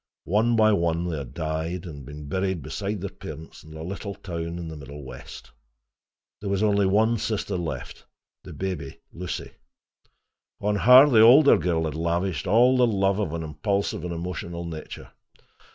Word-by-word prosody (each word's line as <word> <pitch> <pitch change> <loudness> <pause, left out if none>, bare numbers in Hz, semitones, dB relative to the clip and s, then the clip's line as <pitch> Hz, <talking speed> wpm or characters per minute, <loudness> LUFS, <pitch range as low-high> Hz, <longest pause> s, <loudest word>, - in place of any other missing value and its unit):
One 110 +5 +2
by 110 -1 +5
one 85 -2 0
they 85 -3 -3
had 65 -3 -9
died, 80 +2 -3
and 75 -5 -8
been 75 0 -9
buried 95 0 -2
beside 100 +7 -4
their 100 -1 -4
parents 80 +1 -10
in 80 0 -13
a 80 - -7
little 100 +3 -6
town 85 -2 -5
in 85 -1 -6
the 80 - -7
Middle 75 0 -10
West. 65 -1 -11 0.9
There 100 - -5
was 100 +1 0
only 100 -2 +3
one 110 +4 +2
sister 105 -2 -2
left, 85 -3 -5 0.4
the - - -10
baby, 90 -8 -5
Lucy. 90 +1 -5 1.1
On 105 0 0
her 125 +7 +8
the 115 -6 +5
older 135 +6 +8
girl 80 -2 0
had 80 - -3
lavished 85 +2 -1
all 120 +6 +5
the 125 -1 +4
love 100 -2 +1
of 100 -7 -1
an 85 0 -4
impulsive 80 +7 -2
and 90 - -4
emotional 85 0 -5
nature. 80 -2 -8
90 Hz, 170 wpm, -25 LUFS, 80-100 Hz, 1.1 s, her